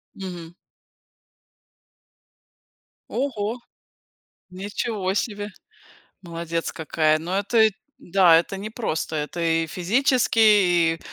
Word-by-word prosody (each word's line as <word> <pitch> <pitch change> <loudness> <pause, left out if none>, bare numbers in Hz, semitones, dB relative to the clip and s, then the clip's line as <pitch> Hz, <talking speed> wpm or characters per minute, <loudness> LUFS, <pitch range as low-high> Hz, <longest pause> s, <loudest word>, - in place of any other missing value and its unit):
Мгм. 175 -3 -8 2.6
Ого! 235 -4 -2 0.9
Ничего 195 +1 -3
себе! 205 -1 -2 0.7
Молодец 170 -1 -4
какая. 155 0 +1
Но 180 +4 -3
это 220 +2 +3
и 220 - +4 0.3
да, 180 -2 +5
это 195 +3 -5
непросто. 205 -6 -3
Это 150 +3 -4
и 165 0 +1
физически, 235 - +1 0.6
и 165 - -17
185 Hz, 85 wpm, -23 LUFS, 165-215 Hz, 2.6 s, да